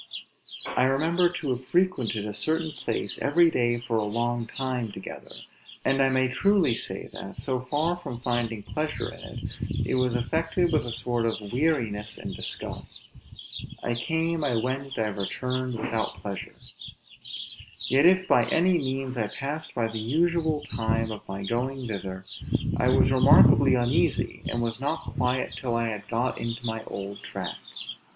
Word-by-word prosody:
I 125 - +4
remember 165 +7 +3
to 170 -6 -3
have 130 +1 -3
frequented 135 - +1
a 105 - -4
certain 160 +9 0
place, - - -2
every 165 +3 +4
day 120 -3 +2
for 120 -1 -1
a 110 - +1
long 120 +2 -1
time 125 -3 -2
together; 95 - -9 0.5
and 135 +1 +3
I 135 - +5
may 130 -1 +3
truly 175 - +3
say - - -3
that, 95 - -8
so 130 -2 -1
far 145 +7 0
from 150 -9 -7
finding 120 -3 -1
pleasure 155 +6 -3
in - - -12
it, - - -8 0.4
I - - 0
was 125 -1 +2
affected 165 +7 +1
with 150 -5 +2
a - - -2
sort 120 0 0
of 115 - +1 0.2
weariness 115 -8 0
and - - -6
disgust; - - -5 0.6
I 120 - 0
came, 160 +6 0
I 135 -5 +1
went, 130 +4 -2
I 110 -1 +1
returned, 125 +5 -2
without 110 0 -2
pleasure; 100 -2 -5 1.3
yet 140 +5 +6
if 185 +1 +4
by 120 - +5
any 175 +7 +3
means 135 -2 -2
I 110 -3 +1
passed 145 +8 -4
by 115 -1 +1
the 110 0 -4
usual 160 +4 +1
time 115 0 +1
of 105 - -8
my 95 +1 -4
going 125 +4 -1
thither, 95 -3 -5 0.5
I - - +3
was - - +4
remarkably - - +7
uneasy, 120 0 +1
and 120 0 0
was 115 +2 -2
not 155 +4 0
quiet 125 -1 0
till 120 -3 -2
I 115 -1 +1
had 105 -1 -5
got 120 +2 0
into 115 +1 -3
my 110 -1 -2
old 100 +1 -6
track. - - -5
125 Hz, 165 wpm, -27 LUFS, 115-150 Hz, 1.3 s, remarkably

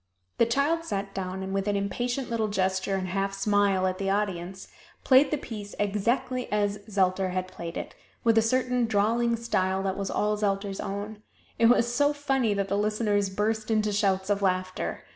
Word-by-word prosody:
The 230 - +5
child 285 +7 +1
sat 200 -8 -4
down, 190 0 -4
and 190 0 -4
with 195 +1 -1
an 205 - +1
impatient 240 +6 -2
little 225 -2 0
gesture 190 -1 0
and 185 -1 -2
half 195 +1 -1
smile 200 -1 +2
at 185 0 -1
the 195 -1 -1
audience, 195 -2 -2 0.4
played 265 +2 +6
the 300 - 0
piece 210 -6 -8
exactly 240 +5 -1
as 205 -1 0
Zelter 190 -1 +1
had 185 0 -2
played 170 -2 -7
it, - - -6 0.3
with 230 -1 +4
a 225 - +6
certain 250 +1 +1
drawling 230 +3 +2
style 190 -5 0
that 190 -1 -2
was 195 -1 -3
all 210 0 +1
Zelter's 200 -1 -1
own. 205 +2 -5 0.4
It 230 - +6
was 240 0 +3
so 285 +4 +3
funny 270 -7 0
that 200 -1 -1
the 200 +1 0
listeners 210 -1 +1
burst 215 +3 -1
into 215 -1 +1
shouts 195 -1 +1
of 200 0 +1
laughter. 185 -1 -1
205 Hz, 185 wpm, -27 LUFS, 195-230 Hz, 0.4 s, played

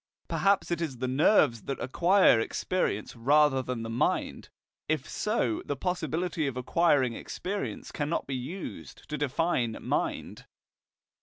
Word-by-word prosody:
Perhaps 200 -2 +1
it 170 -1 -1
is 145 -6 -3
the 130 +2 -2
nerves 130 - +3
that 135 - -3
acquire 175 - +4
experience 115 - -2
rather 140 +3 +4
than 125 -3 -4
the - - -4
mind. 120 - -1 0.4
If 155 -4 0
so, 210 - -1
the 145 - -3
possibility 175 0 -2
of 130 -2 -4
acquiring 135 -2 +2
experience 195 - -5
cannot 150 +2 -2
be 135 - -3
used 150 +10 -7
to 150 - -3
define 145 -5 0
mind. - - -3
145 Hz, 135 wpm, -28 LUFS, 125-175 Hz, 0.4 s, acquire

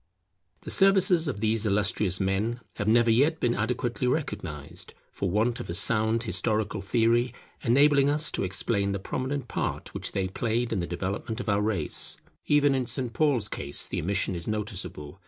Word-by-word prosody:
The - - -4
services 190 -4 +4
of 105 -8 -3
these 110 0 +1
illustrious 100 -2 +1
men 100 +5 -1 0.2
have 105 - -2
never 115 +1 +4
yet 145 +8 +3
been 120 - +1
adequately 120 +3 -1
recognized, 85 - -4 0.2
for 95 - -2
want 110 +5 +1
of - - -7
a 85 - -1
sound 110 +3 +3
historical 105 +1 -1
theory 115 +4 +2 0.3
enabling 140 +3 +4
us 150 +1 0
to - - -1
explain 100 +2 -1
the - - -1
prominent 130 +5 -3
part - - -3
which - - -4
they 95 -1 0
played 115 +4 -1
in 105 - 0
the 85 - -2
development 100 +6 -4
of 120 - -3
our 100 0 +2
race. 105 -7 -1 0.3
Even 145 -1 +4
in 130 -2 -1
St. 125 -4 -2
Paul's 130 -6 +2
case 70 - -3
the - - -3
omission 95 +2 0
is 85 -2 -5
noticeable. 100 -6 -4
110 Hz, 175 wpm, -27 LUFS, 100-125 Hz, 0.3 s, services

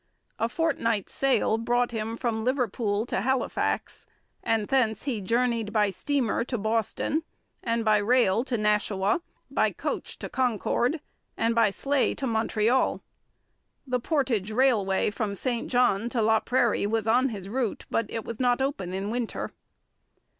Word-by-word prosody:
A 230 - +1
fortnight's 230 - 0
sail 265 -4 +2
brought 240 +1 +1
him 225 0 -3
from 225 -3 -1
Liverpool 230 -4 0
to 220 - -1
Halifax, 265 +3 -1 0.3
and 220 -2 0
thence 240 -5 +1
he 245 -7 -2
journeyed 230 +1 0
by 210 -2 +2
steamer 265 -1 0
to 245 0 -3
Boston, 225 +8 0 0.4
by 230 -2 +2
rail 230 -1 +3
to 255 -3 -1
Nashua, 210 - +1 0.3
by - - +2
coach - - -4
to - - -6
Concord, 250 - 0 0.4
and 230 +1 +2
by 230 -2 +4
sleigh 275 +7 0
to 275 - -3
Montreal. 225 +1 +1 0.8
The 250 -2 0
portage 245 - 0
railway 215 -5 +2
from 210 -2 -3
St 235 +4 -2
John 240 -3 +2
to 245 - -5
Laprairie 220 0 +2
was 220 0 0
on 250 +4 +4
his 200 -5 -6
route, 235 +1 -2
but 230 - 0
it 225 - -4
was 230 - -6
not 245 -1 +2
open 195 -10 -2
in 195 +2 -3
winter. 240 -1 -3
230 Hz, 145 wpm, -27 LUFS, 215-250 Hz, 0.8 s, by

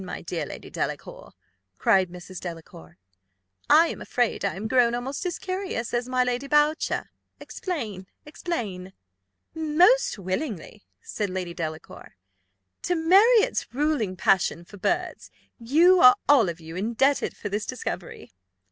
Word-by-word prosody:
my 185 - -6
dear 170 0 -4
Lady - - -10
Delacour," - - -5 0.5
cried 190 - +3
Mrs. 180 0 -10
Delacour: 160 - -10 0.7
"I 320 +3 +7
am - - -7
afraid 245 -2 -1
I 200 - -1
am 210 +3 -4
grown 240 -1 +3
almost 270 +9 -4
as 350 - -3
curious 370 -12 -4
as 240 +1 -1
my 255 0 +2
Lady 250 +2 -2
Boucher. 295 +2 +1 0.3
Explain! 220 - -5 0.2
explain!" 215 - -5 0.6
"Most 350 - +3
willingly," 185 - -5 0.2
said 210 -2 -3
Lady 185 -2 -4
Delacour. 160 - -7 0.7
"To 355 - -1
Marriott's 400 +8 +4
ruling 285 -10 0
passion 185 -2 +1
for 205 - -13
birds - - -2 0.3
you 330 +10 +4
are 250 -4 +8
all 265 -10 +5
of 170 0 -6
you 165 0 -10
indebted 235 +8 0
for 205 - -5
this 205 +2 -3
discovery. - - -6
235 Hz, 135 wpm, -25 LUFS, 185-305 Hz, 0.7 s, are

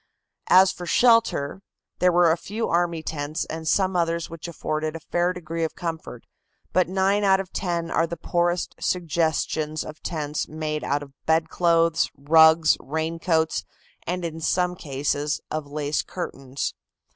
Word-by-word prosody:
As 190 +1 +7
for 180 -2 -8
shelter, 230 - +3 0.4
there 180 0 +4
were 175 -1 +5
a - - +3
few 215 +6 -4
army 170 -2 0
tents 155 +1 -3
and 160 0 -6
some 190 +2 +2
others 170 -1 0
which 165 0 -7
afforded 155 -1 -3
a - - -5
fair 175 +2 0
degree 165 -2 -4
of 160 - -2
comfort, 160 -8 -6 0.5
but 180 0 +3
nine 195 +2 +2
out 190 -1 +4
of 190 -1 -6
ten 170 -3 -2
are 165 - +2
the 170 +1 -5
poorest 175 +2 0
suggestions 160 -2 -1
of 155 0 -10
tents 150 -3 -3
made 155 -1 -3
out 145 +1 -1
of 140 -1 -14
bedclothes, 165 +1 +2
rugs, 160 +2 +5
raincoats 160 +2 -1 0.4
and 180 0 -2
in 165 -1 -5
some 180 +2 +1
cases 145 -1 -2
of 155 -2 -3
lace 145 0 -1
curtains. 135 -6 -5
165 Hz, 150 wpm, -24 LUFS, 155-175 Hz, 0.5 s, As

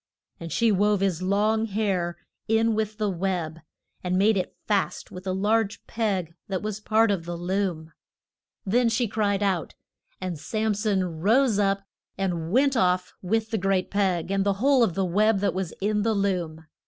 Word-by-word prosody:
And 165 -1 -7
she 230 -1 +3
wove 205 0 +2
his 185 -3 0
long 210 +4 +1
hair 195 -5 -1 0.3
in 225 +1 +3
with 215 0 -2
the 215 - 0
web, 175 -4 -2 0.4
and 180 0 0
made 210 +3 +4
it 185 - -3
fast 205 -3 -1
with 185 +1 -9
a - - +1
large 205 +2 0
peg 195 -7 -2
that 190 -1 -3
was 215 -1 -3
part 220 0 +3
of 180 -5 -2
the 175 0 -4
loom. 175 -3 -2 0.7
Then 235 +4 +3
she 230 +1 +1
cried 205 -1 0
out, 190 -4 -1 0.4
and 180 -4 -4
Sam 215 +7 -1
son 190 -6 -1
rose 225 +2 +3
up 195 -1 +1 0.3
and 175 -4 -2
went 270 +4 +3
off 180 -4 +1
with 220 +4 -1
the 220 - 0
great 195 0 0
peg, 190 -3 0
and 195 0 +1
the 200 0 +2
whole 270 +3 +4
of 185 -8 0
the 195 - +1
web 210 +4 +3
that 205 - +1
was 185 -2 -3
in 210 +1 0
the 220 +1 +1
loom. 175 -5 -1
195 Hz, 180 wpm, -25 LUFS, 185-215 Hz, 0.7 s, made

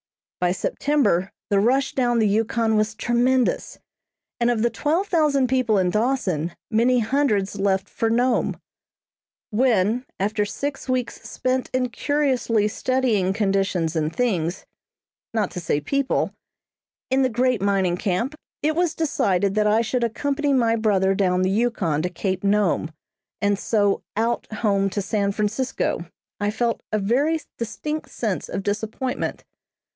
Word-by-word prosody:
By 180 0 +2
September 200 - +1 0.2
the 200 - +4
rush 265 +6 +2
down 240 -2 +1
the 220 -2 +3
Yukon 220 +2 +1
was 215 +1 +1
tremendous, 245 +2 +1 0.6
and 235 0 +2
of 230 -2 +1
the 235 - +2
twelve 325 +6 0
thousand 300 -8 +2
people 245 -4 +2
in 180 -2 +2
Dawson 210 - 0 0.2
many 240 +3 +3
hundreds 220 -5 +1
left 195 0 +1
for 225 - -1
Nome. 240 +2 +1 0.9
When, 225 0 +2 0.2
after 210 +2 0
six 275 +7 -4
weeks 250 -2 -1
spent 255 0 -1
in 255 -1 0
curiously 250 -6 +1
studying 225 -4 +1
conditions 195 -5 0
and 155 -1 0
things, 185 -9 -1 0.7
not 210 -4 0
to - - -5
say 160 -3 0
people, 275 - 0 0.8
in 265 +1 +3
the 260 - +3
great 250 -1 +1
mining 195 -3 +1
camp, 200 +9 -1 0.3
it 310 +1 +1
was 345 -1 +1
decided 200 - +1
that 210 0 +2
I 215 +2 +4
should 235 +2 -1
accompany 280 +5 0
my 230 -3 +3
brother 200 -4 +2
down 185 -2 +1
the 185 - +1
Yukon 195 -9 +1
to 180 - -1
Cape 185 +2 -3
Nome, 200 -5 +2 0.5
and 205 -1 +1
so 205 -3 +1 0.2
"out" 230 +1 -1
home 200 -3 +1
to 200 +2 -2
San 200 -1 0
Francisco, 210 -3 -1 0.3
I 205 0 0
felt 230 +2 -1
a 215 - +2
very 270 +11 +1 0.2
distinct 300 +7 -4
sense 215 -6 -3
of 195 - -3
disappointment. 220 +5 -3
220 Hz, 145 wpm, -23 LUFS, 195-255 Hz, 0.9 s, the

